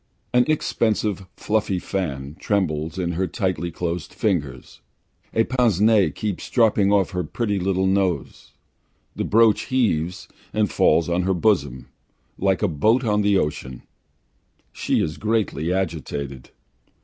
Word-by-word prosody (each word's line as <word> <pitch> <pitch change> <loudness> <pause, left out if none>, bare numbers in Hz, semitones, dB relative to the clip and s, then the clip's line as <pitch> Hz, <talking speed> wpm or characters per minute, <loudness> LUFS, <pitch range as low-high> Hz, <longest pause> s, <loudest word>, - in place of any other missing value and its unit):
An 125 0 +4
expensive 110 -9 0
fluffy 105 -3 0
fan 75 -7 -4
trembles 80 -5 -1
in 90 -2 -1
her 90 +2 -1
tightly 95 -5 -2
closed 85 -1 -4
fingers, 75 - -2 0.5
a 115 - +2
pince 120 -6 +1
nez 105 -7 +4
keeps 105 -4 -4
dropping 105 -4 +3
off 100 -3 +2
her 90 -1 -2
pretty 105 +4 -2
little 95 0 0
nose, 95 -2 -1 0.6
the - - -2
brooch 110 0 +3
heaves 95 -8 0 0.3
and 105 -5 +1
falls 80 +3 +3
on 85 +1 +1
her 95 +1 0
bosom, 75 - 0 0.5
like 95 +1 +1
a - - +4
boat 110 - +2
on 105 -2 +1
the 100 -1 +3
ocean. 65 -6 -3 0.9
She - - 0
is 75 - -4
greatly 105 -6 -1
agitated. 75 -7 -3
95 Hz, 135 wpm, -22 LUFS, 85-105 Hz, 0.9 s, An